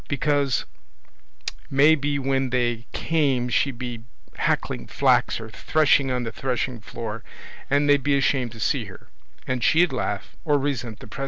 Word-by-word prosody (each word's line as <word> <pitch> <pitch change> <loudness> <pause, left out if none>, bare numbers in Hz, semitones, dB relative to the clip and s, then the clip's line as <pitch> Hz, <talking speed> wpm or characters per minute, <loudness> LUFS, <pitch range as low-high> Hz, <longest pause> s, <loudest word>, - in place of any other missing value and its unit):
Because 145 -2 +1 1.0
may 140 +3 +6
be 145 -1 -1
when 135 -1 0
they 120 -2 -1
came 140 -7 +1
she'd 130 +1 +1
be 120 -2 -5 0.4
hackling - - -1
flax - - +2
or 115 - -7
threshing 145 +2 +2
on 125 -1 -1
the 115 - -4
threshing 125 0 -2
floor, 110 +1 -6 0.5
and 145 +1 +3
they'd 145 -1 +5
be 145 -1 +3
ashamed 130 -3 +1
to 110 - -11
see 95 - 0
her, - - -13 0.4
and 130 -1 -2
she'd 165 -2 +4
laugh, 125 - -3
or 150 -3 +3
resent 125 -6 -3
the - - -10
pr 110 - -10
135 Hz, 160 wpm, -24 LUFS, 120-145 Hz, 1.0 s, may